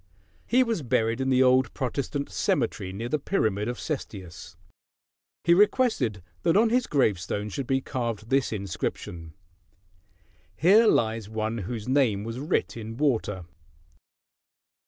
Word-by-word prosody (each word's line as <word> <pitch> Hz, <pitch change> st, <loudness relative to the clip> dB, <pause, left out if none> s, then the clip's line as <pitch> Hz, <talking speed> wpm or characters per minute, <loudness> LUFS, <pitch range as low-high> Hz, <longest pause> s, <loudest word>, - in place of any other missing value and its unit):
He 255 Hz, +2 st, +4 dB
was 230 Hz, -8 st, -2 dB
buried 115 Hz, -1 st, 0 dB
in 130 Hz, -, 0 dB
the 130 Hz, 0 st, +4 dB
old 130 Hz, -1 st, +3 dB
Protestant 140 Hz, +1 st, -3 dB
cemetery 115 Hz, -, -1 dB
near 110 Hz, +5 st, -5 dB
the 150 Hz, +5 st, -1 dB
pyramid 110 Hz, -, 0 dB
of 120 Hz, -, -3 dB
Cestius. 95 Hz, -, -6 dB, 0.9 s
He 170 Hz, -, +5 dB
requested 175 Hz, -, +2 dB, 0.2 s
that 170 Hz, +2 st, +3 dB
on 225 Hz, +1 st, +4 dB
his 250 Hz, 0 st, +2 dB
gravestone 105 Hz, -, 0 dB
should 130 Hz, +5 st, -4 dB
be 135 Hz, 0 st, +1 dB
carved 115 Hz, -4 st, -4 dB
this 135 Hz, -1 st, +2 dB
inscription, 90 Hz, -4 st, -5 dB, 1.2 s
"Here 205 Hz, +9 st, +5 dB
lies 110 Hz, -, +1 dB
one 110 Hz, +1 st, -2 dB
whose 105 Hz, +3 st, -5 dB
name 125 Hz, -7 st, +2 dB
was 115 Hz, +3 st, -5 dB
writ 150 Hz, +6 st, -1 dB
in 115 Hz, 0 st, -7 dB
water." 110 Hz, -, 0 dB
120 Hz, 135 wpm, -26 LUFS, 105-145 Hz, 1.2 s, He